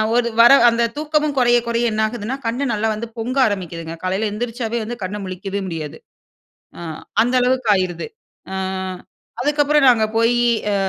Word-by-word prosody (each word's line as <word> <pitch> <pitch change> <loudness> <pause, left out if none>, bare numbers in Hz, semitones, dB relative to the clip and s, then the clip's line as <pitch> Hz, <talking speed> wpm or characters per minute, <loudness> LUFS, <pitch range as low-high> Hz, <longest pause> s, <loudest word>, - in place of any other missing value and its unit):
ஒரு 240 -1 +2
வர 235 - +8 0.2
அந்த 235 0 +1
தூக்கமும் 300 -1 0
குறைய, 240 -1 +4
குறைய 235 0 0
என்ன 215 0 -1
ஆகுதுன்னா? 230 +2 -4
கண் 230 +3 -2
நல்லா 215 +1 0
வந்து 225 +2 -5
பொங்க 245 +4 -3
ஆரம்பிக்குதுங்க. 170 -5 -5
காலைல 190 +4 -1
எந்திரிச்சாவே 230 +1 -3
வந்து, 235 +3 -5
கண்ண 195 +3 -4
முழிக்கவே 190 +2 -5
முடியாது. 160 -3 -6 0.8
அ, - - -8 0.4
அந்த 245 +2 +1
அளவுக்கு 250 -2 +1
ஆயிருது. 185 - -2 0.5
அ, - - -3 0.9
அதுக்கப்றம் 295 0 +3
நாங்க 225 -3 +4
போயி, 235 +1 +3 0.3
அ, - - +1
230 Hz, 155 wpm, -20 LUFS, 200-245 Hz, 0.9 s, வர